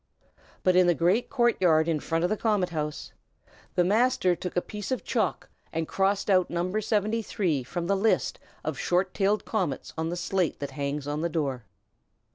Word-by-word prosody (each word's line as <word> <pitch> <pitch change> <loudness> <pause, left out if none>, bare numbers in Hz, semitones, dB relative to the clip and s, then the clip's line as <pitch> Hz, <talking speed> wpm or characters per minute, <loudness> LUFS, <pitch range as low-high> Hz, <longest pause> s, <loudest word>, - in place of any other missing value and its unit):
But 185 -1 +4
in 180 -1 +6
the 175 - +4
great 185 +9 +2
court 240 -3 +2
yard 160 -3 +4
in 160 -2 +1
front 165 +2 -1
of 180 - +1
the - - +3
Comet 210 -4 +1
House, 150 -2 -4 0.6
the 180 - +4
Master 205 -2 +3
took 180 +1 -5
a - - +6
piece 210 -2 -6
of 260 - -2
chalk, 210 - -1 0.2
and 160 0 -2
crossed 195 +1 +1
out 185 -3 +3
No. 180 +4 -1
73 210 - 0
from 170 +7 -4
the 200 +3 +2
list 215 +3 +1 0.2
of - - -3
short 185 +1 +1
tailed 205 +2 +1
comets 185 - -2
on 160 0 -1
the 175 - -2
slate 175 -1 0
that 140 -1 -5
hangs 140 +1 -3
on 150 +1 -2
the 170 - 0
door. 140 -7 -2
180 Hz, 190 wpm, -27 LUFS, 160-205 Hz, 0.6 s, in